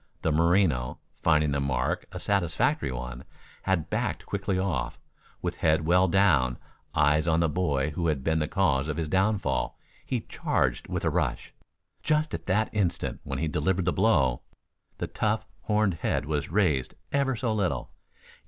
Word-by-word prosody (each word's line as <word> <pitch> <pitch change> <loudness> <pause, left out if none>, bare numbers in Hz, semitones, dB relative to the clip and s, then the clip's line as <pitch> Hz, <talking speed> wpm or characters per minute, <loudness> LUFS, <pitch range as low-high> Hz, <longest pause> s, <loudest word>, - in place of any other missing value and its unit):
The 80 - +2
Merino, 80 -5 +2 0.2
finding 75 -3 +3
the 70 - 0
mark 70 -2 -1
a - - -6
satisfactory 90 -8 +1
one, 60 0 -6 0.4
had 90 -5 -1
backed - - -1
quickly 100 -1 -2
off. 75 -11 -2 0.4
With - - -2
head 80 0 +2
well 90 +3 +4
down, 80 -10 +3 0.4
eyes 75 +1 +3
on 80 -1 +3
the 85 - +3
boy 75 -3 0
who 85 +2 -1
had 75 -4 0
been 80 +1 +1
the 75 - 0
cause 75 -8 +1
of 75 - -3
his 80 -2 -1
downfall, 95 +4 0 0.3
he - - -2
charged - - -1
with - - -3
a - - +2
rush. - - -1 0.5
Just 155 0 +1
at 80 - -5
the 105 +4 +2
instant 100 -5 -1
when - - -4
he 80 - -1
delivered 85 +5 0
the 90 - +2
blow, 80 - +3 0.6
the - - -2
tough, 110 0 -1 0.2
horned 105 -2 +2
head 80 - -1
was 75 -1 -2
raised 80 -9 +1 0.2
ever 140 -2 +1
so 115 -1 -1
little. 90 - -1
80 Hz, 165 wpm, -27 LUFS, 75-95 Hz, 0.6 s, well